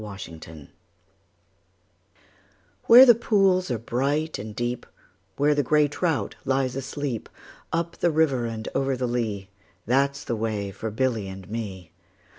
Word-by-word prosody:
A - - -8
Boy's 100 -2 -7
Song 80 -3 -11 2.2
WHERE 245 +3 +10
the 240 - +8
pools 195 -6 +2
are 120 - 0
bright 140 +8 -1
and 105 0 -7
deep, 120 +1 -3 0.5
Where 145 +1 +3
the 145 - +2
grey 150 +2 +3
trout 160 +1 -1
lies 130 -1 0
asleep, 135 -2 -4 0.4
Up 170 0 -2
the 175 - +2
river 145 -7 +1
and 110 -1 -6
over 135 -1 0
the 125 - -1
lea, 110 -5 -3 0.3
That 140 +4 +2
's 140 - -8
the 120 - -2
way 105 -3 -2
for 105 +3 -5
Billy 110 -2 -1
and 95 -1 -9
me. 95 -7 -6
125 Hz, 150 wpm, -25 LUFS, 110-145 Hz, 2.2 s, WHERE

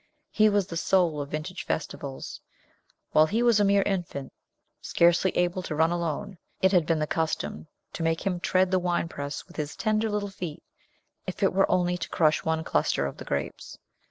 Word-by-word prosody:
He 215 0 +5
was 205 -2 +2
the 170 -3 -5
soul 170 -4 +2
of 140 - -6
vintage 155 +5 -4
festivals. 140 -3 -5 0.7
While 155 +1 +5
he 225 +7 +1
was 235 -3 +5
a - - +4
mere 200 0 +4
infant, 175 -9 -3 0.5
scarcely 175 +2 +3
able 180 +1 +1
to 155 - -4
run 160 +2 +3
alone, 175 +3 -3 0.2
it 190 - +4
had 175 -5 +3
been 165 - +2
the 155 - 0
custom 115 - -2 0.3
to - - -5
make 165 0 0
him 180 -3 0
tread 185 +1 +2
the 185 - +3
winepress 165 -5 -2
with 175 - -16
his 150 -1 -3
tender 215 0 0
little 205 -1 -2
feet, 175 -5 -6 0.6
if - - -4
it - - +3
were 195 +1 +3
only 180 -1 +1
to - - -4
crush 155 -2 +2
one 160 0 0
cluster 75 - +1
of 70 - -5
the - - -9
grapes. - - -4
175 Hz, 190 wpm, -27 LUFS, 155-190 Hz, 0.7 s, He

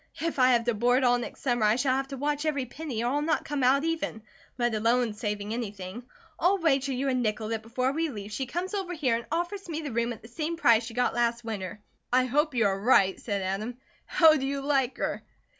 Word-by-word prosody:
If 330 -3 -2
I 255 0 +6
have 235 -1 +3
to 240 0 +1
board 245 +4 +2
all 245 -1 +4
next 240 - -7
summer, 245 -4 +1
I 210 +1 +4
shall 255 +1 +1
have 270 0 -1
to 275 -1 -7
watch 295 +2 -1
every 285 -4 0
penny, 255 -3 -5
or 240 - +1
I'll 290 +2 +1
not 310 0 0
come 290 -2 -2
out 270 +3 +4
even, 325 -9 -2 0.3
let 240 -2 +1
alone 230 +1 +2
saving 210 0 -3
anything. 205 -2 -5 0.4
I'll 370 +4 +3
wager 275 -6 +1
you 265 +2 -1
a 265 - +1
nickel 220 -3 -1
that 225 -1 -2
before 255 +4 -1
we 325 +3 -1
leave, 205 -5 -7
she 260 +5 -3
comes 355 - -3
over 380 -3 -2
here 265 -7 +1
and 230 - -5
offers 350 +3 -3
me 315 -1 -2
the 290 -3 -5
room 235 +1 0
at 225 - -8
the - - -11
same 315 +7 -3
price 235 -7 +4
she 225 -1 -8
got 250 0 +1
last 235 0 0
winter." 210 -2 -5 0.3
"I 255 +1 +4
hope 295 +3 +1
you 230 -3 +3
are 195 -1 +1
right," 195 -4 +4
said 200 -4 -2
Adam. 210 +6 -3 0.3
"How 320 -2 +6
do 270 -1 -2
you 280 0 -2
like 275 -2 +1
her?" - - -2
250 Hz, 240 wpm, -28 LUFS, 225-290 Hz, 0.4 s, I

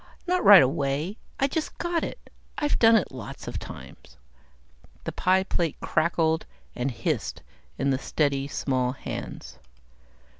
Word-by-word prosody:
Not 365 0 +1
right 200 -6 +10
away. 140 - -1 0.2
I 275 - +4
just 310 +3 -3
got 345 -1 -1
it. - - -7 0.3
I've 295 -1 0
done 225 0 +7
it 215 - +2
lots 125 -6 -8
of - - -4
times." 65 +1 -11 0.9
The - - -3
pie 185 +1 +2
plate 170 -5 -2
crackled 160 -1 +1 0.3
and 125 +3 -1
hissed 120 - -3 0.3
in 135 0 +1
the 130 - 0
steady, 140 -2 0
small 130 -3 -1
hands. - - -7
160 Hz, 140 wpm, -26 LUFS, 135-215 Hz, 0.9 s, right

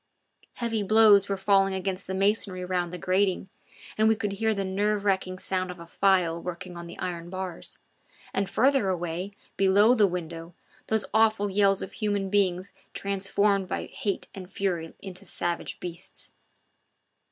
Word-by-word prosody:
Heavy 230 -3 -1
blows 205 -1 +6
were 195 - 0
falling 195 0 +3
against 190 0 -3
the 190 - -3
masonry 195 -2 +1
round 180 -1 -1
the 180 - -5
grating, 190 +1 +1 0.5
and 220 - +5
we 220 - +4
could 210 -2 -2
hear 220 +3 0
the 200 -2 -1
nerve 205 +2 0
racking 190 -2 0
sound 185 0 -2
of 180 -1 -8
a 170 - -9
file 175 -2 +2
working 180 0 -6
on 170 0 -7
the 170 - -9
iron 175 -2 -4
bars; 185 -2 -5 0.6
and 195 0 -1
farther 265 -5 +3
away, 175 +1 -2 0.3
below 200 +4 +5
the 215 -5 +4
window, 170 -1 -6 0.3
those 220 -1 0
awful 215 -2 +3
yells 195 0 +3
of - - -7
human 205 -3 -2
beings 190 -2 +1 0.2
transformed 200 0 +1
by - - -3
hate 200 -2 -3
and 185 -2 -9
fury 175 -5 -2
into 190 0 -7
savage 175 -2 -3
beasts. 170 -1 -9
195 Hz, 160 wpm, -27 LUFS, 180-205 Hz, 0.6 s, blows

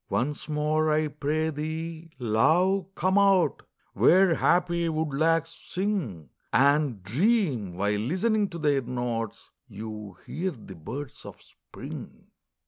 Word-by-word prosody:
Once 145 +5 -2
more, 155 +1 +1
I 155 0 +2
pray 155 +2 -1
thee, 160 +2 -5
love, 165 - +2
come 190 +2 +2
out, 195 -3 +3 0.3
Where 185 0 +5
happy 170 0 +2
woodlarks 160 +1 +1 0.2
sing, 155 - -2 0.2
And 140 -6 +3
dream, 135 - +1
while 105 +2 0
listening 200 - +1
to 170 - -7
their 145 -4 +2
notes, 120 -3 -4 0.2
You 105 -3 -8
hear 185 +3 -2
the 115 - -10
birds 125 - -7
of - - -10
Spring. - - -11
150 Hz, 120 wpm, -27 LUFS, 120-170 Hz, 0.3 s, Where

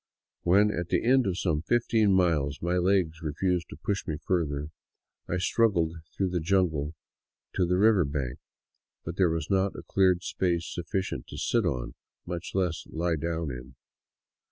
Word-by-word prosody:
When, 100 +4 +4
at 85 -4 -3
the - - +1
end 130 -1 +4
of 90 -2 -1
some 80 -6 0
fifteen 110 +1 +2
miles, 80 -7 +2
my 85 +2 0
legs 90 -3 +1
refused 85 +3 -1
to - - -8
push 100 -1 -3
me 75 - -2
further, 75 -5 -1 0.6
I 90 - 0
struggled 90 -4 +2 0.2
through 95 -1 +1
the 90 - 0
jungle 80 -4 +1 0.6
to 90 -2 +1
the 90 +1 +2
river 105 -2 +5
bank; 70 -4 -3 0.7
but 80 +3 -5
there 95 -3 +4
was 80 0 -2
not 95 0 +2
a - - -8
cleared 95 -2 +2
space 85 -4 0
sufficient 90 -5 -3
to - - -9
sit - - +1
on, - - -3 0.3
much 85 0 -5
less 90 -4 0
to - - -17
lie 85 +1 +1
down 80 -1 -2
in. 65 +2 -9
85 Hz, 170 wpm, -28 LUFS, 80-95 Hz, 0.7 s, river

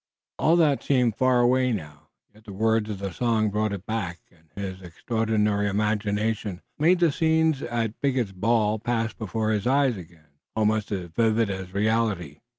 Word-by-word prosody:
All 165 - +4
that 155 -5 +3
seemed 125 -5 +2
far 130 0 +3
away 125 +1 +3
now, 75 -9 -6 0.2
yet 110 +1 -21
the 100 - -9
words 110 +1 +1
of 105 - -4
the 95 -1 -5
song 110 -2 +1
brought 105 +1 0
it 100 -1 -6
back, 100 -6 -3
and 80 -2 -27
his 95 -2 -5
extraordinary 105 +2 0
imagination 105 -1 -1 0.2
made 170 +5 +4
the 170 -3 +4
scenes 160 -2 +2
at 115 -2 -3
Bigot's 130 -7 0
ball 110 +2 +1
pass 115 0 -1
before 110 +1 -2
his 105 +1 -1
eyes 135 -3 +2
again, 80 -5 -15 0.2
almost 110 -1 +1
as 90 -4 -4
vivid 110 +2 +2
as 95 -1 -6
reality. 100 -7 0
110 Hz, 165 wpm, -25 LUFS, 100-120 Hz, 0.2 s, All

